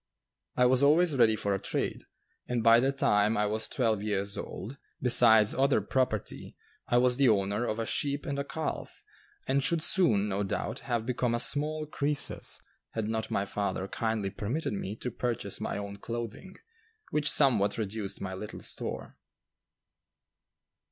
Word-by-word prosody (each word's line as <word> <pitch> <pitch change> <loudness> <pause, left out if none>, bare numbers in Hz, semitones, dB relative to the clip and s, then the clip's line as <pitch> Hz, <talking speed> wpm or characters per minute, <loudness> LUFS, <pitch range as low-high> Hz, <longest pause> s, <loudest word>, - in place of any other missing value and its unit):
I 125 - +5
was 130 +1 +3
always 155 +2 +4
ready 110 -4 +4
for 100 -1 -1
a 95 - -1
trade, - - -3 0.4
and 120 -2 -1
by 115 0 +7
the 135 +3 +2
time 105 -5 +2
I 105 - +2
was 110 +1 0
twelve 110 -6 0
years 100 -1 -2
old, 115 +9 -7 0.2
besides 110 -4 +5
other 135 +1 +3
property, 125 -6 -2 0.3
I 120 - +2
was 125 0 +3
the 135 -3 +4
owner 100 +2 +1
of 110 - -2
a 115 - -2
sheep 140 +4 -2
and 140 0 -3
a - - -1
calf, 155 +2 -5 0.4
and 135 +1 +2
should 155 +4 +1
soon, 110 - +4
no 100 0 -1
doubt, 95 - -3
have 115 -2 -2
become 125 -1 0
a - - -1
small 155 +4 +1
Crœsus, 145 -1 -2 0.3
had 110 -1 -2
not 110 0 -2
my 100 - -1
father 100 -1 -3
kindly 110 -2 -2
permitted 110 +10 -3
me 100 0 -4
to 125 +2 -5
purchase 115 -5 -3
my - - -3
own 100 0 -6
clothing, 120 - -6 0.6
which 150 -1 +1
somewhat 120 -9 +4
reduced 105 -2 -4
my 95 -1 -4
little 105 +3 -7
store. - - -6
115 Hz, 165 wpm, -29 LUFS, 105-135 Hz, 0.6 s, by